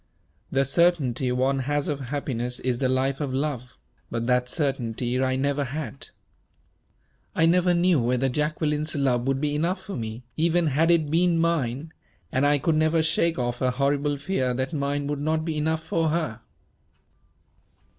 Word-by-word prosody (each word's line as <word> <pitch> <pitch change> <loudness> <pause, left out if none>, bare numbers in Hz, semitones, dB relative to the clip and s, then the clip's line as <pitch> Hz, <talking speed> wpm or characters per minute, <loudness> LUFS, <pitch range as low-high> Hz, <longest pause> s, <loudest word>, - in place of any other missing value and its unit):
The 135 0 +1
certainty 135 -5 +2
one 130 +2 +1
has 145 +2 -1
of 145 -2 -2
happiness 125 -2 -3
is 125 -2 -1
the 130 - +1
life 135 +2 0
of 135 -3 -2
love; 130 -3 -3 0.3
but 115 0 -2
that 125 0 +1
certainty 125 -4 -1
I 130 0 +1
never 140 +2 0
had. 140 +1 -6 1.3
I 165 - +4
never 180 +1 +3
knew 175 -2 +3
whether 125 +2 +1
Jacqueline's 150 +2 -1
love 130 -3 +1
would 135 0 +1
be 145 0 -1
enough 170 +6 0
for 200 - -6
me, 115 0 -5
even 170 +2 +2
had 155 +3 +2
it 160 -4 +3
been 170 +1 +3
mine; 160 -3 -1 0.4
and 130 +3 +2
I 145 0 +4
could 155 +3 +1
never 160 +1 +2
shake 165 +1 +1
off 120 -1 -2
a 130 - +2
horrible 140 +2 0
fear 135 -5 -1
that 130 +3 -2
mine 145 -1 -1
would 145 0 -3
not 155 +1 0
be 160 -2 -2
enough 160 +1 -1
for 165 -1 0
her." 150 -8 -2
140 Hz, 165 wpm, -25 LUFS, 130-160 Hz, 1.3 s, I